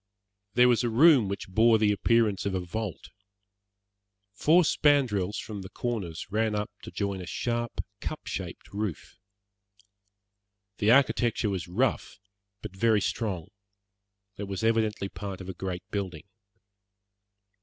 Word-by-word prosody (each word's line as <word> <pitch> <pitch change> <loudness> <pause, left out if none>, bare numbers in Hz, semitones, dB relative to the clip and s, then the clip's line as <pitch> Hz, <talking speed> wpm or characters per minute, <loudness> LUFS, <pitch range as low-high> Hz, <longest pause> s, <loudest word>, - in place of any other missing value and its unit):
There 125 +1 +6
was 120 -1 +3
a 120 - +1
room 130 -1 +6
which 100 +1 -4
bore 110 +4 +4
the 105 -1 +3
appearance 105 -1 +2
of 95 - -1
a - - 0
vault. 95 +1 -5 1.2
Four 160 +11 +4
spandrels 130 - +2
from 105 -3 -6
the 95 - -9
corners 100 -9 -4
ran 110 0 +1
up 105 0 -2
to - - -9
join 100 -2 -3
a 90 - -8
sharp, 120 +2 -2
cup - - -6
shaped - - -6
roof. 100 -5 -5 1.6
The 105 - +2
architecture 120 -4 +3
was 95 -3 -3
rough, 90 - -1 0.5
but 100 -3 -7
very 110 +1 +3
strong. 95 -5 -2 0.9
It 100 - -4
was 100 +2 -4
evidently 110 -3 +1
part 100 -1 -7
of 95 0 -8
a - - -4
great 90 -1 -5
building. 95 -6 -4
105 Hz, 135 wpm, -28 LUFS, 95-115 Hz, 1.6 s, There